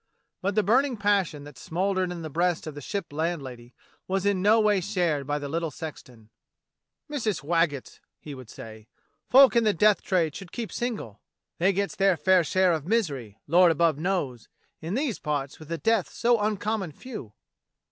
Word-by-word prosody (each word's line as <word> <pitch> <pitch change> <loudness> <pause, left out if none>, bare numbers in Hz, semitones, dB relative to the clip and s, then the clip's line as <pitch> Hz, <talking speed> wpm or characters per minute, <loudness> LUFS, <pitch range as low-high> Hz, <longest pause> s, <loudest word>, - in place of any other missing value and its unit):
But 200 +1 -1
the 215 - +3
burning 255 +5 +2
passion 200 -8 +1
that 145 -3 -12
smouldered 185 +1 -1
in 170 -2 -6
the 155 - -5
breast 175 +2 0
of 155 - -6
the 145 - -9
Ship 200 +1 -4
landlady 135 -7 -4 0.3
was 195 +1 -1
in 200 -2 +2
no 215 +3 +5
way 210 -3 +3
shared 170 -8 -1
by 145 0 0
the 145 -1 -5
little 165 +3 -2
sexton. 125 -7 -10 0.8
"Missus 220 - -2
Waggetts," 165 -3 0 0.2
he 150 - -9
would 130 -4 -11
say, 110 -1 -11 0.4
*'folk 265 0 +7
in 235 - +4
the 215 -2 +2
death 210 +4 +4
trade 165 -5 0
should 195 -3 -9
keep 235 -3 -5
single; 215 - -4 0.4
they 185 +3 +4
gets 200 +1 -2
their 195 -3 +3
fair 185 0 +4
share 185 +2 +2
of 160 -1 -3
misery, 140 - -1
Lord 175 +3 +5
above 165 -2 +2
knows, 155 -10 -2 0.3
in 165 +5 -3
these 265 -4 -1
parts 145 -3 -3
with 155 - -12
the 165 +1 -3
deaths 220 +4 0
so 235 -1 +3
uncommon 210 -4 -1
few." 215 - -9
175 Hz, 180 wpm, -26 LUFS, 145-205 Hz, 0.8 s, folk